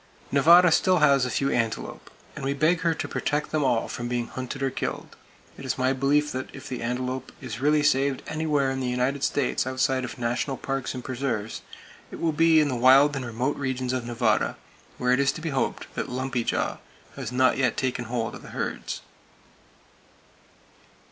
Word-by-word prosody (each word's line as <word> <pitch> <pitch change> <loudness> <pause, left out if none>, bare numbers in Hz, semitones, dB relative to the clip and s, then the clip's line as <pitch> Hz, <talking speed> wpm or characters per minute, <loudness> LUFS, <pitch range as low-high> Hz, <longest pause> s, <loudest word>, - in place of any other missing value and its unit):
Nevada 170 +5 +7
still 185 +3 +4
has 140 -4 +4
a - - -3
few 140 +2 0
antelope; 115 -3 -2 0.3
and - - -7
we 140 +1 -1
beg 160 +4 +2
her 165 -1 +1
to - - -4
protect 150 0 -2
them 155 -2 +1
all 120 -4 +1
from 120 - -5
being 120 -1 -1
hunted 130 +1 -5
or 135 - +1
killed! - - -4 0.4
It - - -8
is - - -2
my 130 +1 +2
belief 145 +3 +2
that 130 +1 -4
if - - -9
the 125 - -5
antelope 125 +2 -3
is 125 -2 -7
really 150 +1 +3
saved 140 -2 +2
anywhere 150 -4 0
in 135 - -3
the 130 -1 -1
United 130 +3 -1
States 135 -2 0
outside 130 0 0
of 125 - -6
national 120 +3 -1
parks 135 -1 -3
and 125 - -6
preserves, 120 -5 -3 0.5
it - - -9
will 165 - +1
be 160 +1 +5
in 150 - +3
the 130 - -1
wild 135 +4 +6
and 135 - -3
remote 125 +4 -2
regions 130 -2 -2
of 130 -2 -1
Nevada, 120 -1 +1 0.4
where 125 0 +1
it 125 - +3
is 140 0 +3
to - - -7
be 165 - -3
hoped 135 -2 -1
that - - -4
lumpy 130 -1 -2
jaw - - -1 0.4
has 130 -4 -5
not 130 +1 +3
yet 130 -3 +1
taken 125 -2 -1
hold 115 -1 -2
of - - -9
the - - -12
herds. - - -4
130 Hz, 195 wpm, -26 LUFS, 125-145 Hz, 0.5 s, Nevada